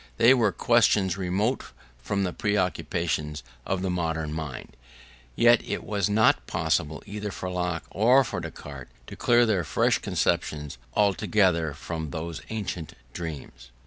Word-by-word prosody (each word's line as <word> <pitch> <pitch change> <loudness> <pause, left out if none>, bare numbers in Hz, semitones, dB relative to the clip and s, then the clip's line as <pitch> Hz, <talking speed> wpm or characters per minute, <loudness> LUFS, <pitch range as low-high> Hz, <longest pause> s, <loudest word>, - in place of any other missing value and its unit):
They 120 +3 +7
were 115 -6 +3
questions 105 -6 +3
remote 100 +7 0 0.4
from 100 +11 -1
the 90 - -2
preoccupations 85 - -1 0.2
of 95 -1 -1
the 95 - 0
modern 80 -3 -2
mind; 75 -5 -6 0.6
yet 120 0 +5
it - - -4
was 100 -3 -1
not 110 +2 +3
possible 80 -2 -1
either 105 0 -5
for 95 -1 -5
Locke 90 -2 -2
or 125 +6 +5
for 120 - -4
Descartes 70 -3 -8 0.2
to - - -9
clear 120 0 +4
their 100 -6 +1
fresh 75 - +2
conceptions 75 -6 -1 0.2
altogether 95 -5 +2
from 80 0 -5
those 85 0 -5
ancient 100 -7 -4 0.2
dreams. 70 -7 -7
90 Hz, 140 wpm, -26 LUFS, 80-105 Hz, 0.6 s, They